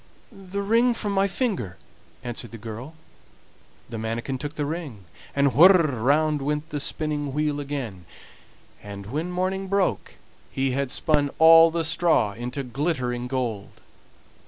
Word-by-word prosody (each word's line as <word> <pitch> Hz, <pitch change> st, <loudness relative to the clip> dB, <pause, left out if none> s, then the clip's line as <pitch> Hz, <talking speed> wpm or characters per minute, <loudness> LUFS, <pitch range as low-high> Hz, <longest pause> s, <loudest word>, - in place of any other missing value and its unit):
"The 195 Hz, +1 st, -6 dB
ring 230 Hz, +4 st, +3 dB
from 210 Hz, -2 st, -3 dB
my 195 Hz, 0 st, +2 dB
finger," 190 Hz, -, -2 dB, 0.5 s
answered 120 Hz, -1 st, -5 dB
the 115 Hz, -, -9 dB
girl. 115 Hz, +8 st, -8 dB, 0.9 s
The 115 Hz, -2 st, -6 dB
manikin 115 Hz, +4 st, -3 dB
took 145 Hz, +3 st, -6 dB
the 145 Hz, -, -2 dB
ring, 145 Hz, -, -5 dB, 0.3 s
and 140 Hz, -2 st, +3 dB
whir! 175 Hz, -, +8 dB, 0.3 s
round 150 Hz, +3 st, +2 dB
went 150 Hz, +2 st, -2 dB
the 145 Hz, -, -2 dB
spinning 145 Hz, -1 st, -2 dB
wheel 150 Hz, 0 st, 0 dB
again, 130 Hz, -11 st, -5 dB, 0.8 s
and 100 Hz, -1 st, -9 dB
when 150 Hz, -, -3 dB
morning 185 Hz, +2 st, -2 dB
broke 200 Hz, -1 st, -1 dB, 0.3 s
he 135 Hz, 0 st, -1 dB
had 135 Hz, +1 st, -1 dB
spun 145 Hz, +1 st, +1 dB
all 165 Hz, +1 st, +8 dB
the 165 Hz, 0 st, -1 dB
straw 160 Hz, -, +2 dB
into 125 Hz, +5 st, -5 dB
glittering 125 Hz, -2 st, -2 dB
gold. 120 Hz, -6 st, -4 dB
145 Hz, 140 wpm, -24 LUFS, 125-165 Hz, 0.9 s, whir